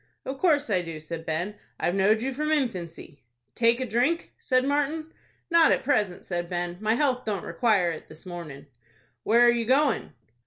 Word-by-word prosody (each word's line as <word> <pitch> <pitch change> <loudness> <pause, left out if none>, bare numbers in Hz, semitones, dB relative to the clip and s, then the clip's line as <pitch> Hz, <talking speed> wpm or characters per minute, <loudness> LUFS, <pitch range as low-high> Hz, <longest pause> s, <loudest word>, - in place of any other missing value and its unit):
"Of 265 +1 -5
course 295 - +2
I 185 -3 +2
do," 165 -2 -7
said 160 +1 -7
Ben. 175 +6 -3 0.2
"I've 175 - 0
knowed 210 +4 +3
you 270 +1 -2
from 305 +3 -2
infancy." 175 - -3 0.3
"Take 235 +1 +3
a 260 - -1
drink?" 255 +9 0
said 255 -1 +1
Martin. 295 +3 -1 0.4
"Not 335 -1 +6
at - - +1
present," 210 -10 0
said 175 -1 -3
Ben. 175 0 -3
"My 220 +1 +2
health 255 -2 +1
don't 205 -4 -3
require 205 -8 +2
it 160 - -9
this 155 +3 -13
mornin'." 165 -6 -8 0.6
"Where 230 +3 +3
are 240 - +7
you 235 -1 -1
going?" 270 - +2
220 Hz, 185 wpm, -26 LUFS, 175-270 Hz, 0.6 s, are